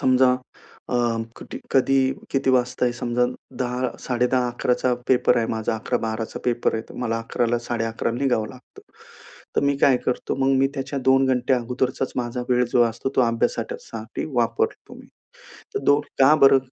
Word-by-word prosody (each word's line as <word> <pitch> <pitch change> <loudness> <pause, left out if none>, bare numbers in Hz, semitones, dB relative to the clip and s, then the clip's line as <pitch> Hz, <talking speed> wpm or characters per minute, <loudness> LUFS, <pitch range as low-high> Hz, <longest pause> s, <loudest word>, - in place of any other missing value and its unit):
समजा 130 0 +4 0.6
अ, 125 - 0 0.4
कटी - - -8
कधी, 135 0 +3 0.2
किती 135 -1 +1
वाजता 125 0 +1
आहे 120 - +1
समजा 120 +1 0 0.4
10, 125 0 -1 0.2
10:30, 125 0 +1
11 125 +1 0
पेपर 125 -1 +4
आहे 115 - 0
माझा 110 +1 -1
11-12 110 -1 -3
पेपर 120 -2 +1
आहे 110 +2 -6
मला 115 -2 -1
11 115 +1 -1
ला 120 +1 +1
11:30 115 -1 -1
ला 120 - -4
निघावं 120 -6 +1
लागतं. 125 +2 -15 0.8
तर - - +4
मी 140 0 +2
काय 135 -2 +5
करतो 125 - -1
मग 135 0 +2
मी 135 - +4
त्याच्या 135 +1 -3
2 135 0 +4
घंटे 125 0 +1
अगोदरचा 125 +2 -1
माझा 125 0 -2
वेळ 125 0 +3
जो 120 - +5
असतो 115 +3 -2
तो - - +5
अभ्यासासाठी 115 -1 -2
वापरतो 115 -1 -1
मी. - - -14 0.7
तर - - +1
2, 145 +1 +5 0.2
का 135 +3 +7
बरं 135 -3 +6
125 Hz, 165 wpm, -23 LUFS, 120-130 Hz, 0.8 s, का